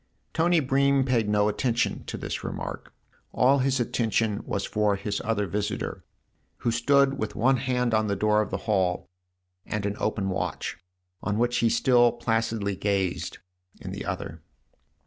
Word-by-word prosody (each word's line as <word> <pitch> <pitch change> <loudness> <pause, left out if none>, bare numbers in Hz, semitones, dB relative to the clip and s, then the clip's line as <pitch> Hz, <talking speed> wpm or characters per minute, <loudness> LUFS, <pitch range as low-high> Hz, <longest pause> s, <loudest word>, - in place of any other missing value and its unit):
Tony 170 +1 +3
Bream 140 0 +3
paid 120 -5 +1
no 105 0 +3
attention 120 +2 0
to - - -5
this - - -4
remark; - - -5 0.4
all 135 +2 +4
his 135 0 +1
attention 115 -2 0
was 100 - -1
for 105 -1 +1
his 100 +1 -3
other 105 -2 0
visitor, 105 +3 -3 0.5
who 120 - 0
stood 140 +4 +3
with 110 - -3
one 130 +3 +3
hand 125 -2 0
on 110 0 +2
the 100 - 0
door 105 +1 +3
of 110 - -3
the - - -2
hall 95 -5 +1 0.6
and 105 -1 -3
an 100 0 -1
open 100 -2 -1
watch, 95 - -3 0.4
on 105 +1 -1
which 120 +1 +1
he 115 -1 +3
still 120 0 +4
placidly 115 -3 -1
gazed, 100 -2 -1 0.4
in - - -7
the - - -5
other. - - -5
115 Hz, 160 wpm, -26 LUFS, 105-125 Hz, 0.6 s, all